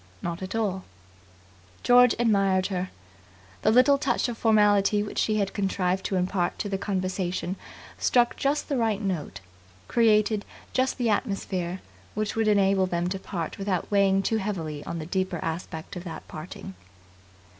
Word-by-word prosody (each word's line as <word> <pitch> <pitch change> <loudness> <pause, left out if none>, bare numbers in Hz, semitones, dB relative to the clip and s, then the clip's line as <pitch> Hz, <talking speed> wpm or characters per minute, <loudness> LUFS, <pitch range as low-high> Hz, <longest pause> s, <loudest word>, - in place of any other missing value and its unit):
"Not 170 +1 -3
at 190 +3 -5
all." 195 -4 -1 1.0
George 245 0 +6
admired 195 -5 +2
her. 185 0 -2 0.7
The - - +3
little 255 +5 +5
touch 260 -3 +1
of 240 - -4
formality 210 -2 +3
which 210 - -4
she 215 - +1
had 200 -2 -1
contrived 190 -2 0
to 195 - -1
impart 180 -1 0
to - - -3
the 195 -1 -2
conversation 185 -2 -2 0.4
struck 240 -1 +3
just 285 +2 0
the 280 - -1
right 220 -4 +1
note, 185 - -3 0.5
created 215 -2 +3 0.3
just 260 0 +1
the 240 -3 +1
atmosphere 190 -4 -2 0.3
which 215 0 -2
would 225 -1 +1
enable 195 -2 +3
them 175 0 -1
to 190 +1 -3
part 175 -1 -5
without 195 -2 -2
weighing 195 -1 +3
too 225 - +1
heavily 165 -8 -3
on 170 - -4
the 155 - -5
deeper 185 +1 -1
aspect 160 0 -5
of 175 - -6
that 165 - -7
parting. 155 - -8
195 Hz, 155 wpm, -26 LUFS, 185-215 Hz, 1.0 s, George